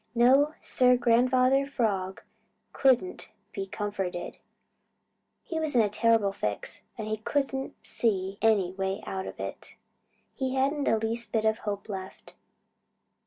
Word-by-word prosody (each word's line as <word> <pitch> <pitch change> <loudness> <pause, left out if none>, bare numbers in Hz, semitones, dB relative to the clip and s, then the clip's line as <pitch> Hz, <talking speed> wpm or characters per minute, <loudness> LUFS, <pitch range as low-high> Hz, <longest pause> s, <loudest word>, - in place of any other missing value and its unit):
No, 270 +6 +5
Sir, 250 -1 +4
Grandfather 255 +3 +3
Frog 200 -8 -1 0.5
couldn't 245 -9 +2 0.2
be 195 -1 -4
comforted. 195 -3 -4 1.1
He 325 - -3
was 310 -4 -1
in 235 - +6
a 210 - +1
terrible 215 -1 +2
fix, 105 - -4 0.2
and 215 -2 -4
he 215 0 -1
couldn't 270 +3 -2
see 195 -3 -1
any 210 -5 +3
way 190 0 -3
out 190 0 -4
of - - -9
it. - - -7 0.6
He 265 -1 -2
hadn't 280 +2 +1
the 225 - +3
least 225 +2 -2
bit 220 -1 +1
of 220 0 +2
hope 205 -1 -4
left. 190 -3 -8
225 Hz, 135 wpm, -28 LUFS, 195-255 Hz, 1.1 s, in